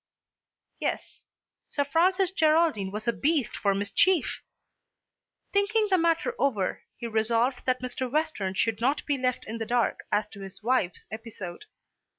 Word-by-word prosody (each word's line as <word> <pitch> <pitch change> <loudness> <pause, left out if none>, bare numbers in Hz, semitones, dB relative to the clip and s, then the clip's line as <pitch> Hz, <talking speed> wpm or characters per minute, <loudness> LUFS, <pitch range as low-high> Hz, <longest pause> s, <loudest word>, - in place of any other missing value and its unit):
Yes; - - -4 0.4
Sir 285 - 0
Francis 365 +5 +2
Geraldine 315 - +3
was 210 +3 -6
a 235 - +3
beast 290 -2 0
for 200 -1 +1
mischief! 255 - +2 1.1
Thinking 420 +2 +2
the 375 - +6
matter 335 +8 +2
over, 210 -9 0 0.2
he 240 - -6
resolved 230 +3 +1
that 255 0 +1
Mr. 255 0 -3
Western 280 -11 -1
should 225 +2 0
not 270 +5 +1
be 290 - +1
left 255 -1 -1
in 225 +2 -5
the 225 - -2
dark 240 -1 +1
as 210 0 +1
to 200 - -12
his 195 +1 -10
wife's 230 -7 0
episode. 220 - -7
250 Hz, 150 wpm, -27 LUFS, 215-320 Hz, 1.1 s, the